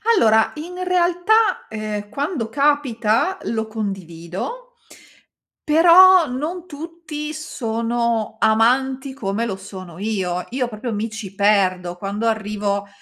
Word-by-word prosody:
Allora, 220 - +4
in 355 +4 -7
realtà, 360 +5 +2
ehm, 215 -2 -5
quando 275 - -3
capita, 280 - +1
lo 220 -1 -2
condivido, 195 - -6 0.9
però 345 +3 +7
non 310 +8 -4
tutti 310 -1 -7
sono 235 -6 -2
amanti 260 +5 +2
come 225 -3 -2
lo 200 -5 -3
sono 185 -3 -10
io. 185 -4 -2
Io, 250 -1 -1
proprio, 225 +1 -5
mi 215 +2 -2
ci 215 -3 -8
perdo. 185 -3 +2
Quando 200 +4 -3
earrivo, 205 -2 -2
230 Hz, 110 wpm, -21 LUFS, 205-300 Hz, 0.9 s, però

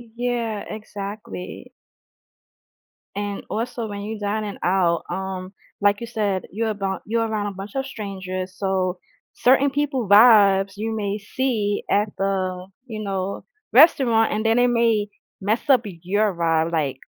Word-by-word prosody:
Yeah, 235 -3 -2
exactly. 205 -3 -7 1.4
And 205 0 -4
also, 230 0 -3
when 205 -1 -6
you're 215 +1 -5
dining 205 0 -2
out, 175 -2 +2
um, 190 0 -4 0.3
like 205 +1 +3
you 235 - -4
said, 205 -5 -1
you're 225 +3 -1
about 195 -2 -3
you're 230 +1 0
around 215 -2 -2
a 200 - -5
bunch 195 +2 -8
of 270 0 -1
strangers, 190 -6 -5
so, 190 -2 -1 0.4
certain 270 +3 +4
people 270 -4 -1
vibes 200 -2 +6
you 220 +1 -2
may 205 -1 -2
see 215 -2 -1
at 205 +1 +2
the, 185 -2 -1 0.2
you 220 -3 -5
know, 195 -1 -3 0.3
restaurant, 245 -6 +5
and 215 +1 -2
then 225 +1 +3
they 245 0 +5
may 230 -3 +2 0.3
mess 215 +4 +1
up 255 -4 +6
your 195 +3 -1
vibe, 165 -1 +1
like 145 -5 0
205 Hz, 145 wpm, -23 LUFS, 190-225 Hz, 1.4 s, vibes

